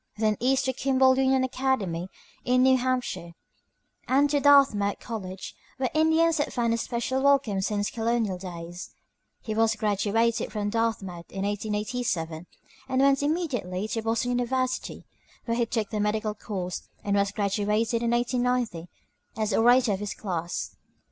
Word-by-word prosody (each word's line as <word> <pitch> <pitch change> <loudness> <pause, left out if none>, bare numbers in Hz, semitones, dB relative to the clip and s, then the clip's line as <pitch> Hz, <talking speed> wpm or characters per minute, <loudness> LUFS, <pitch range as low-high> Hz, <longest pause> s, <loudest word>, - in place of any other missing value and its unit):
then 215 -1 +2
east 265 +2 +2
to 260 - 0
Kimball 260 0 +3
Union 265 0 +2
Academy 230 -10 -1 0.3
in 255 0 +3
New 260 0 +6
Hampshire, 250 -9 -2 0.7
and 275 +3 +4
to 290 - +3
Dartmouth 275 -9 +4
College, 190 -5 -6 0.2
where 260 -1 -1
Indians 320 +1 +3
had 290 - 0
found 235 -2 0
a - - +1
special 240 +3 -2
welcome 275 -8 +3
since 205 +1 -1
colonial 225 -5 -1
days. 175 -1 -8 0.5
He 220 - -3
was 225 +1 +2
graduated 215 +2 0
from 205 -1 -2
Dartmouth 205 -7 -2
in 195 - -4
1887, 205 -5 -2 0.4
and 260 0 +1
went 275 0 +4
immediately 260 - -1
to 225 - -2
Boston 225 +2 0
University, 255 +1 -2 0.4
where 230 -1 -1
he 235 -1 +1
took 220 -3 -2
the 215 - -2
medical 210 +1 0
course, 190 -4 -5
and 200 0 0
was 200 0 +2
graduated 210 +3 0
in 235 - 0
1890 240 -7 0 0.5
as 215 -2 -1
orator 240 +1 +4
of 195 - -1
his 210 -1 -4
class. 175 -4 -4
225 Hz, 150 wpm, -26 LUFS, 200-255 Hz, 0.7 s, New